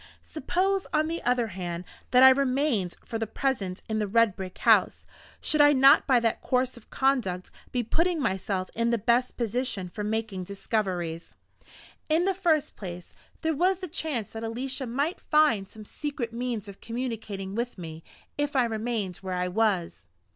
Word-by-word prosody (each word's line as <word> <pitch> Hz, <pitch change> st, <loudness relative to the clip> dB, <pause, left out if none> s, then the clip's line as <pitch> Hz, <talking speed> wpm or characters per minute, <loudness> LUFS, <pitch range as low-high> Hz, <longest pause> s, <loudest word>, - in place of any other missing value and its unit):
Suppose, 375 Hz, +6 st, -1 dB
on 310 Hz, 0 st, +2 dB
the 335 Hz, +1 st, -3 dB
other 245 Hz, -2 st, +1 dB
hand, 175 Hz, -2 st, -5 dB, 0.3 s
that 250 Hz, +1 st, +6 dB
I 265 Hz, -, +11 dB
remained 260 Hz, -, +1 dB
for 225 Hz, -, -4 dB
the 225 Hz, -, -2 dB
present 205 Hz, -7 st, -2 dB
in 220 Hz, 0 st, -1 dB
the 210 Hz, -, 0 dB
red 225 Hz, -1 st, +3 dB
brick 185 Hz, -2 st, -7 dB
house -, -, +3 dB, 0.3 s
should 305 Hz, -, +2 dB
I 290 Hz, 0 st, +7 dB
not 270 Hz, 0 st, +6 dB
by 255 Hz, -3 st, +5 dB
that 230 Hz, -1 st, 0 dB
course 255 Hz, 0 st, 0 dB
of 235 Hz, -, -15 dB
conduct 240 Hz, -10 st, 0 dB, 0.2 s
be 245 Hz, -1 st, 0 dB
putting 335 Hz, +8 st, +1 dB
myself 190 Hz, -6 st, -1 dB
in 230 Hz, +1 st, +1 dB
the 235 Hz, -, +2 dB
best 240 Hz, +3 st, +1 dB
position 235 Hz, -5 st, -2 dB
for 210 Hz, +4 st, -5 dB
making 215 Hz, -3 st, -2 dB
discoveries? 185 Hz, -5 st, -3 dB, 0.7 s
In 325 Hz, +3 st, +3 dB
the 390 Hz, -, +2 dB
first 340 Hz, -6 st, +1 dB
place, 180 Hz, -3 st, -8 dB, 0.3 s
there 320 Hz, 0 st, +1 dB
was 365 Hz, +5 st, +2 dB
the 370 Hz, 0 st, -6 dB
chance 300 Hz, -, -3 dB
that 225 Hz, 0 st, -6 dB
Alicia 255 Hz, +4 st, -3 dB
might 285 Hz, -, -1 dB
find 245 Hz, -11 st, +3 dB
some 215 Hz, -1 st, -12 dB
secret 265 Hz, -3 st, -4 dB
means 235 Hz, -3 st, -3 dB
of 200 Hz, -1 st, -11 dB
communicating 225 Hz, -5 st, -4 dB
with 235 Hz, +2 st, -3 dB
me 160 Hz, -2 st, -8 dB, 0.4 s
if 290 Hz, -1 st, -1 dB
I 260 Hz, -, +5 dB
remained 220 Hz, -4 st, -2 dB
where 190 Hz, -1 st, -4 dB
I 180 Hz, 0 st, 0 dB
was. 180 Hz, -, 0 dB
230 Hz, 175 wpm, -27 LUFS, 195-275 Hz, 0.7 s, I